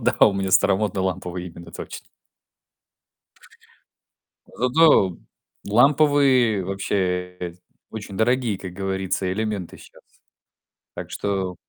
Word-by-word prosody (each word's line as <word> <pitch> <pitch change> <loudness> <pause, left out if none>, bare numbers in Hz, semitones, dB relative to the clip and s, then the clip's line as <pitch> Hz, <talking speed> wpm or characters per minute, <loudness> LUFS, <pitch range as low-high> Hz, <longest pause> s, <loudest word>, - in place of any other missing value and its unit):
Да, - - 0
у 100 - +2
меня 95 -1 -2
старомодный, 95 +1 +2
ламповый, 90 -1 -3
именно, 85 0 -11
точно. - - -9 2.4
Зато 125 - +3 0.5
ламповые 130 -4 +4
вообще 90 -2 -2 0.4
очень 100 -3 -8
дорогие, 115 -2 +1
как 95 -2 -8
говорится, 95 0 -2
элементы 105 -3 -4
щас. - - -17 0.9
Так - - -7
что, 95 -3 -2
95 Hz, 90 wpm, -23 LUFS, 90-110 Hz, 2.4 s, ламповые